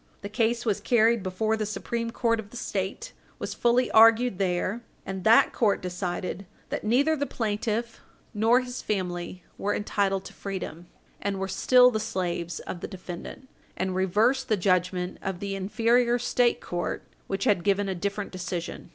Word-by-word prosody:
The 200 - -4
case 230 +2 0
was 210 -4 +1
carried 230 -1 +3
before 205 +4 0
the 220 - -2
Supreme 230 +2 -3
Court 230 -1 0
of 205 -2 -7
the 245 - -9
State, 205 - -4 0.2
was - - -4
fully 245 +1 +2
argued 225 -1 +6
there, 190 +4 0 0.2
and 190 -1 -5
that 225 +1 +6
court 210 -4 +2
decided 180 +1 -4 0.2
that - - -3
neither 275 +8 +3
the 285 -1 -2
plaintiff 225 +1 -2 0.3
nor 225 +4 +4
his 250 0 -6
family 180 -3 -3 0.2
were 205 +1 0
entitled 195 -2 0
to - - -9
freedom, 185 -3 -6 0.3
and 200 -1 -1
were 195 - -2
still 250 +5 +5
the 220 - -1
slaves 175 -5 -3
of 175 - -6
the - - -5
defendant, 190 +7 -8 0.3
and 185 0 -1
reversed 210 +8 +2
the 215 - +3
judgment 180 0 0
of 190 -2 -4
the 200 0 -3
inferior 235 +5 +2
State 245 0 +1
court, 175 0 -3 0.2
which 195 0 -2
had 195 -5 +2
given 200 0 +2
a 190 - -1
different 200 +3 -3
decision. 180 -2 -5
205 Hz, 170 wpm, -27 LUFS, 185-230 Hz, 0.3 s, argued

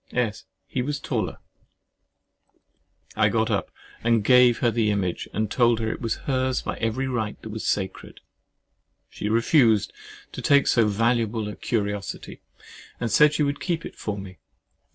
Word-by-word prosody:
S. 115 -4 -2 0.2
He 130 - -3
was 145 +3 -2
taller! 110 - -3 1.8
[I - - +3
got - - 0
up - - -1 0.3
and 115 -2 +3
gave 125 0 +6
her 120 - +2
the 115 -2 +1
image, 95 -4 -1
and 110 +1 -2
told 120 -2 +3
her 110 -1 -1
it - - -6
was 115 -2 -1
hers 130 -1 0
by - - -4
every 115 +4 -1
right 110 -5 -3
that 110 - -7
was 110 0 -5
sacred. 95 -2 -3 0.9
She 105 - -4
refused 115 -1 +3
at - - -32 0.3
first - - -33
to - - -6
take 140 -1 +4
so 115 -3 +3
valuable 115 0 0
a 105 - -6
curiosity, 105 -3 -3 0.6
and 115 - -2
said 150 0 +5
she 150 - +2
would 140 0 -1
keep 170 -3 -2
it - - -8
for 105 -1 -4
me. 95 -2 -9
115 Hz, 170 wpm, -24 LUFS, 105-125 Hz, 1.8 s, gave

